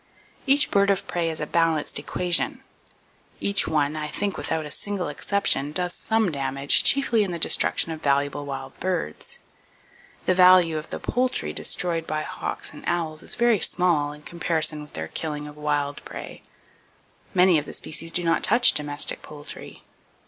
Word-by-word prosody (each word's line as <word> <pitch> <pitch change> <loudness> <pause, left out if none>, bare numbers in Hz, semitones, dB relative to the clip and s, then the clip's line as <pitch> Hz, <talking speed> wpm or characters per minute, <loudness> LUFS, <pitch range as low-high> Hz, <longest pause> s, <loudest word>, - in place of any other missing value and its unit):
Each 280 +2 +4
bird 200 0 +3
of 195 - +1
prey 170 -2 -1
is 160 - -3
a 150 - -2
balanced 165 -1 0
equation. 180 -1 0 0.8
Each 200 0 +2
one, 150 -1 0
I 155 -1 -3
think 200 +6 -3
without 160 -1 -2
a 150 - -8
single 200 0 -2
exception, 150 -3 0
does 180 +3 0
some 220 -4 0
damage, 140 0 +2
chiefly 250 -6 +3
in 195 - -3
the 175 - -3
destruction 165 0 +1
of 160 -1 -6
valuable 145 0 0
wild 135 -1 -6
birds. 180 - -3 0.9
The 185 - +3
value 180 -3 +6
of 155 - -11
the - - -5
poultry 255 +1 -1
destroyed 165 -2 0
by 155 0 -2
hawks - - -5
and - - -12
owls 160 -3 -1
is - - -2
very 235 -3 +3
small 160 -4 +2
in 150 0 -12
comparison 160 -3 -2
with 150 - -12
their 80 0 -4
killing 150 -2 -4
of 150 - -11
wild 145 -1 -2
prey. - - -9 0.9
Many 180 -3 +5
of 145 - -7
the - - -8
species 165 +1 -4
do 175 - -1
not 165 -1 +1
touch 240 +4 +6
domestic 145 -1 +1
poultry! 150 -1 -10
165 Hz, 170 wpm, -24 LUFS, 150-185 Hz, 0.9 s, value